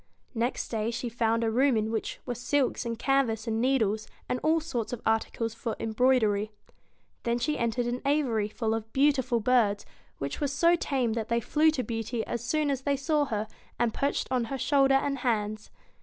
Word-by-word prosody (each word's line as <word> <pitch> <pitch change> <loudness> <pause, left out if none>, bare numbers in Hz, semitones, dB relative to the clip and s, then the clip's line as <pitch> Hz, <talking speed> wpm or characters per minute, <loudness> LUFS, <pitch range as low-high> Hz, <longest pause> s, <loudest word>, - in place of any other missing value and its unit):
Next 240 +1 -1
day 220 -1 -1
she 235 +1 -3
found 230 0 +1
a 225 - +1
room 260 +1 +3
in 220 +1 -1
which 225 - -3
were 245 - -2
silks 250 +1 0
and 230 -1 -3
canvas 235 -4 +1
and 225 0 -1
needles, 220 -5 +1 0.2
and 250 - -1
all 320 +1 +3
sorts 245 -8 -3
of 245 - -5
articles 225 0 0
for 230 -1 -4
embroidery. 220 -3 +2 0.7
Then 235 0 0
she 300 +5 0
entered 235 +1 0
an 245 +1 -2
aviary 270 -7 +1
full 220 0 -1
of 225 0 -4
beautiful 265 -4 +2
birds, 220 -3 +2 0.3
which 140 - -4
were 290 - +2
so 335 +5 +3
tame 260 -8 0
that 225 -1 -3
they 235 0 +2
flew 305 +7 +3
to 290 -5 -1
Beauty 225 0 -3
as 235 0 -4
soon 295 +4 +1
as 270 -1 -2
they 280 0 0
saw 295 +1 +1
her, 215 -4 -2 0.3
and 235 -1 +1
perched 280 +1 -1
on 250 -2 +1
her 270 +4 -4
shoulder 275 0 +3
and 275 0 0
hands. 215 -3 -1
240 Hz, 195 wpm, -28 LUFS, 225-270 Hz, 0.7 s, room